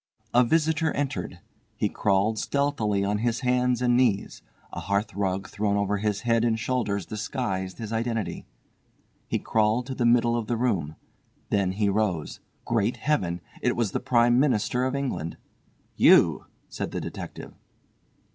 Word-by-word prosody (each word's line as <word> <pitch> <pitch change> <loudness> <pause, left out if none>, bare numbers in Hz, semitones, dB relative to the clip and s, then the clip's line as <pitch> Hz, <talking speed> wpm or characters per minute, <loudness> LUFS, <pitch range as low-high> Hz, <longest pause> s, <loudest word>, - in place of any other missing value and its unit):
A 125 +1 +6
visitor 160 +4 +2
entered. 135 -10 -3 0.4
He - - +1
crawled 105 +2 +1
stealthily 130 -9 0
on 105 +1 0
his 120 +2 -1
hands 125 -1 +1
and 120 -1 +3
knees. 120 -6 +1 0.3
A - - -4
hearthrug 100 -1 -1
thrown 100 -1 -1
over 100 0 0
his 105 0 -1
head 115 -1 +2
and 115 -2 +2
shoulders 105 -5 -1
disguised 105 -4 -3
his 115 -1 -5
identity. 115 -1 -2 0.8
He - - 0
crawled 110 +2 +1
to 135 - -5
the 120 -2 +1
middle 120 0 +4
of 115 -2 -2
the 120 - 0
room. 95 -11 -1 0.6
Then 95 -3 +1
he 105 +1 0
rose. 100 -6 -1 0.3
Great 115 0 0
Heaven! 90 - -1 0.2
It - - +1
was 115 -5 0
the - - -1
Prime 120 -1 +3
Minister 125 -2 +1
of 130 +1 -1
England. 130 - -3 0.6
"You!" - - +5 0.2
said - - -4
the - - -4
detective. - - -7
115 Hz, 150 wpm, -26 LUFS, 100-125 Hz, 0.8 s, A